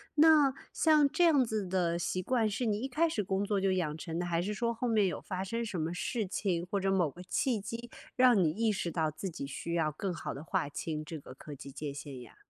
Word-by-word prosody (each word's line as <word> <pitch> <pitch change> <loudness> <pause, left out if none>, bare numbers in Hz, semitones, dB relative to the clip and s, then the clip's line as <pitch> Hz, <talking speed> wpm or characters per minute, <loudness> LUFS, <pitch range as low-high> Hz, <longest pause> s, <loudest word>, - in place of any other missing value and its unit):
那 300 -3 +6 0.2
像 305 -3 +4
这 310 +4 +2
样 290 -6 +5
子 220 -4 -2
的 175 -2 +1
习 185 +2 -1
惯 235 +2 +1
是 220 +3 -1
你 210 -1 +1
一 260 - -2
开 320 +5 +2
始 215 -9 -1
工 195 +1 0
作 205 -1 0
就 195 0 +2
养 165 -5 -1
成 165 +1 -4
的， 175 - -1
还 170 -1 +1
是 210 +2 -2
说 235 +2 0
后 245 +2 -2
面 215 -4 +3
有 180 - -3
发 185 -1 -4
生 230 +4 -2
什 180 -6 -3
么 160 - -1
事 205 +4 -2
情， 185 -3 -1
或 200 - 0
者 195 0 +1
某 180 -5 +2
个 180 +6 -11
契 225 +5 0
机， 230 +3 -6 0.3
让 250 -3 +6
你 155 - +3
意 220 +5 +1
识 180 -4 -2
到 160 -2 +1
自 155 +6 -5
己 155 -5 -5
需 170 +4 -5
要 160 -2 +1
更 180 +5 -3
好 - - -5
地 140 - -7
划 145 - -1
清 155 +1 -4
这 160 +1 -6
个 140 - -11
科 145 +2 -10
技 140 +1 -10
界 145 +1 -5
限 140 -2 -8
呀？ 120 - -14
190 Hz, 280 characters per minute, -31 LUFS, 165-230 Hz, 0.3 s, 那